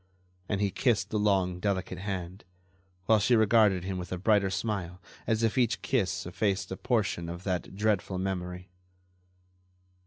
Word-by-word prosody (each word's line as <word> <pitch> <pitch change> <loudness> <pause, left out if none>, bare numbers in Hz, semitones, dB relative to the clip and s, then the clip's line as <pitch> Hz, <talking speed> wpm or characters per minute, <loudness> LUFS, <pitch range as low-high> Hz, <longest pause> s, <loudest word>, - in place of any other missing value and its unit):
And 100 -1 0
he 100 -1 +1
kissed 120 -1 +1
the 105 - 0
long, 95 -3 +1
delicate 95 -1 -2
hand, 95 -1 -5 0.6
while 110 +1 +5
she 120 +4 +3
regarded 110 -4 +4
him 95 0 -3
with 90 - -7
a 90 - -2
brighter 100 +1 +3
smile 95 -3 -3 0.3
as 110 0 +1
if 115 +3 +2
each 125 0 +1
kiss 115 -9 0
effaced 95 +2 -1
a - - -2
portion 105 -8 -1
of 85 +1 -7
that 90 -1 -3
dreadful 100 -2 0
memory. 90 -1 -4
100 Hz, 155 wpm, -29 LUFS, 90-110 Hz, 0.6 s, while